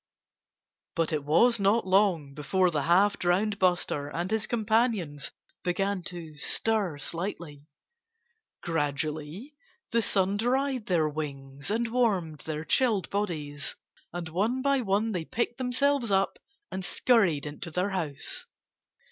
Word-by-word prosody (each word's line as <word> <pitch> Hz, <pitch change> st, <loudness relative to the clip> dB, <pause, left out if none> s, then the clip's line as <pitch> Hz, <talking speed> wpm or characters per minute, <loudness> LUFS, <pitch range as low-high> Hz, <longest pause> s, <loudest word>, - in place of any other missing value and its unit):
But 165 Hz, -2 st, 0 dB
it 150 Hz, -2 st, 0 dB
was 230 Hz, +10 st, +4 dB
not 200 Hz, +3 st, +3 dB
long 185 Hz, -7 st, +2 dB
before 180 Hz, +6 st, +1 dB
the 150 Hz, -3 st, 0 dB
half 195 Hz, +6 st, +3 dB
drowned 195 Hz, +4 st, +1 dB
Buster 175 Hz, -6 st, +1 dB
and 175 Hz, +5 st, -3 dB
his 220 Hz, -1 st, +1 dB
companions 220 Hz, -, 0 dB, 0.3 s
began 195 Hz, +2 st, 0 dB
to 160 Hz, -4 st, -7 dB
stir 210 Hz, -7 st, +1 dB
slightly. 165 Hz, -2 st, -4 dB, 1.0 s
Gradually 155 Hz, -, -2 dB, 0.4 s
the 230 Hz, -, +3 dB
sun 195 Hz, -1 st, +1 dB
dried 255 Hz, +1 st, 0 dB
their 165 Hz, -4 st, +2 dB
wings 140 Hz, -2 st, -5 dB
and 225 Hz, +2 st, 0 dB
warmed 195 Hz, -11 st, +1 dB
their 155 Hz, 0 st, -4 dB
chilled 215 Hz, -, +2 dB
bodies. 155 Hz, -8 st, -3 dB, 0.4 s
And 175 Hz, -1 st, -5 dB
one 220 Hz, +10 st, 0 dB
by 275 Hz, -1 st, +3 dB
one 210 Hz, +1 st, +1 dB
they 180 Hz, -5 st, -2 dB
picked 235 Hz, +7 st, -2 dB
themselves 255 Hz, 0 st, +1 dB
up 195 Hz, 0 st, +1 dB, 0.3 s
and 190 Hz, -, -4 dB
scurried 185 Hz, -, +2 dB
into 150 Hz, +3 st, -6 dB
their 180 Hz, +5 st, -1 dB
house. 160 Hz, -7 st, -3 dB
185 Hz, 130 wpm, -28 LUFS, 155-220 Hz, 1.0 s, was